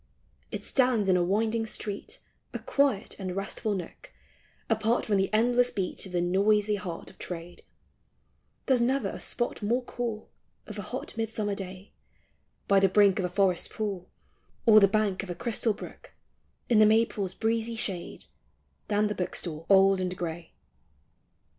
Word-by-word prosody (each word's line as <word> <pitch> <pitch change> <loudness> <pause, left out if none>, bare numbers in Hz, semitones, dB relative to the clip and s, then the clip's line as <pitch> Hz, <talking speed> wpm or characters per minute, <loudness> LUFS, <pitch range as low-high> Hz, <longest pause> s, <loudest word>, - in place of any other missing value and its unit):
It - - -6
stands 250 -7 +2
in 185 - +5
a 180 - +3
winding 220 +4 0
street, 205 -1 -5 0.3
A - - -2
quiet 275 -8 0
and 185 -2 -4
restful 200 +2 -2
nook, 190 - -8 0.6
Apart 225 +1 +1
from 205 -2 +2
the 195 0 0
endless 245 +3 +3
beat 190 -5 -3
Of - - -12
the 175 -1 0
noisy 205 +4 +2
heart 185 -5 -5
of 190 - -24
Trade; 175 0 -7 1.0
There 265 - +4
's 245 - +1
never 265 +3 +1
a - - -7
spot 240 -1 -1
more 235 +5 0
cool 235 -3 -5 0.3
Of - - -8
a - - -2
hot - - -6
midsummer 220 -2 -2
day 190 0 -8 0.8
By 200 -1 +5
the 195 0 +4
brink 200 0 +4
of 185 - 0
a - - -2
forest 185 -1 +1
pool, 200 -5 -4 0.6
Or 215 -2 +8
the 200 - +6
bank 200 -1 0
of 195 - -9
a 175 - -3
crystal 230 +2 0
brook - - -11 0.5
In 230 -3 +4
the 215 - +7
maples' 215 -3 +1
breezy 225 +1 -1
shade, 195 -6 -4 0.6
Than 210 0 +2
the 210 - 0
book 180 -3 -3
stall 165 -1 -5
old 195 -1 +5
and 180 0 -3
gray. 165 -1 -5
205 Hz, 165 wpm, -28 LUFS, 185-225 Hz, 1.0 s, Or